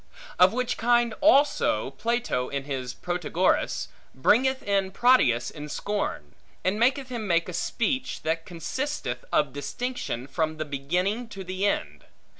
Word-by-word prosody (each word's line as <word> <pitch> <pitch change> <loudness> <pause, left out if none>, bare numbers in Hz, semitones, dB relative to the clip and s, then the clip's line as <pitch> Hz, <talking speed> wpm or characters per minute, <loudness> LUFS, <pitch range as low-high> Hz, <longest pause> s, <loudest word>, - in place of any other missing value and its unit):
Of 180 +1 +7
which 250 +1 -1
kind 240 0 +3
also, 295 0 +3
Plato, 230 - -1
in 140 -1 -3
his 130 -3 -4
Protagoras, 175 +3 0 0.3
bringeth 260 - +3
in 195 -1 +1
Prodicus 185 - +3
in 150 0 -8
scorn, 200 - -3 0.3
and 190 +3 0
maketh 260 +2 +2
him 235 -4 -4
make 170 -2 +2
a 180 - -6
speech, 255 +8 -1
that 165 +1 -1
consisteth 175 - -4
of 145 -4 +2
distinction 145 - -4
from 155 +2 -2
the 155 - -3
beginning 180 - -1
to 195 -3 -7
the 185 +2 -1
end. 75 - -2
190 Hz, 140 wpm, -26 LUFS, 145-240 Hz, 0.3 s, Of